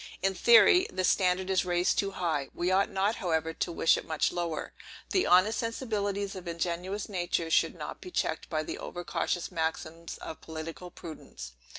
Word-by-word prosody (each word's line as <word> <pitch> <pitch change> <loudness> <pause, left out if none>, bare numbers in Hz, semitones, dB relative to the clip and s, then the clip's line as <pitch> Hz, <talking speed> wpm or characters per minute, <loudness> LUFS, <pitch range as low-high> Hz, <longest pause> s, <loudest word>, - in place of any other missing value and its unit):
In 195 0 +2
theory, 235 - +6
the 185 0 -2
standard 185 0 +2
is 190 - +3
raised 175 0 +1
too 200 - +1
high; 165 -8 -2
we 175 +1 0
ought 195 +3 +3
not, 200 +2 0
however, 160 -2 -1
to 170 - -2
wish 165 - +3
it - - -7
much 160 -1 +1
lower. 170 -3 -3 0.4
The 375 - +2
honest 185 +5 +5
sensibilities 205 -4 -2
of 185 -2 -8
ingenuous 175 +4 -3
nature 175 -4 -1
should - - +3
not - - -7
be 365 - -8
checked 160 - -2
by 155 -1 -1
the - - -5
over 175 - -6
cautious 175 +1 -2
maxims 165 0 -3
of 160 - -8
political 160 +2 -7
prudence. 155 - -9
180 Hz, 180 wpm, -29 LUFS, 165-195 Hz, 0.4 s, theory